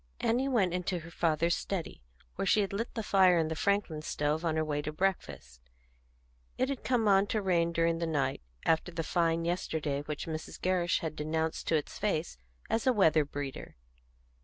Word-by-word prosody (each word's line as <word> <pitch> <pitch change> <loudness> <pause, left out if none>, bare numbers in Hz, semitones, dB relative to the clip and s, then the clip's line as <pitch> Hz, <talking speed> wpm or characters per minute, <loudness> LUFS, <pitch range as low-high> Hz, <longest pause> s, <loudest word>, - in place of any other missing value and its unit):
Annie 250 +4 +1
went 205 -10 +2
into 180 0 -1
her 170 +1 -11
father's 165 0 +1
study, 185 -2 -4 0.3
where - - -3
she 210 - +4
had 200 -1 -2
lit 230 +4 -2
the 225 - -2
fire 185 -3 +5
in 160 -1 +1
the 160 - -2
Franklin 200 -4 0
stove 150 +1 -1
on 165 -2 0
her 155 0 +1
way 150 -1 -1
to 155 +1 -4
breakfast. 150 - -3 1.0
It 255 - +1
had 275 -3 -4
come 240 -4 +1
on 195 0 +5
to 215 - 0
rain 175 -4 +1
during 165 0 +1
the 170 - -1
night, 135 - -1 0.2
after 165 +2 +2
the 165 -1 -3
fine 165 0 +1
yesterday 160 -5 -1
which 150 0 -5
Mrs. 160 -1 -6
Gerrish 180 -2 +1
had 160 -2 -4
denounced 160 +1 -2
to 165 - +3
its 150 - -3
face - - -1 0.3
as 225 +3 -1
a 255 - +5
weather 160 -8 +4
breeder. 145 -1 -6
170 Hz, 190 wpm, -31 LUFS, 155-195 Hz, 1.0 s, fire